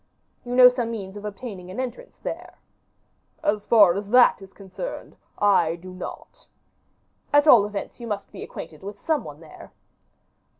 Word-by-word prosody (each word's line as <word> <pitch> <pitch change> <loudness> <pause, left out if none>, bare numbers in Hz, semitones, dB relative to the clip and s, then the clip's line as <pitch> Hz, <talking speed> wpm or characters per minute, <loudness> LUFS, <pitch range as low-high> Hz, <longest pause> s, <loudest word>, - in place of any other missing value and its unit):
"You 245 0 -4
know 250 0 +9
some 250 -2 0
means 200 -4 -6
of 205 0 -8
obtaining 200 -3 -7
an 185 - -7
entrance 260 - -6
there." - - -7 0.9
"As 205 0 0
far 205 -6 +6
as 200 +2 -5
that 245 -3 +5
is 195 0 -12
concerned, 195 - -8 0.2
I 175 -5 +3
do 185 +2 -11
not." 185 - -10 0.8
"At 290 0 +5
all 230 -9 +7
events, 205 +3 -7
you 235 - -7
must 205 -2 -5
be - - -10
acquainted 160 -2 -9
with 200 +1 -8
some 310 -6 -1
one 150 +1 -11
there." 160 - -14
205 Hz, 165 wpm, -24 LUFS, 190-245 Hz, 0.9 s, know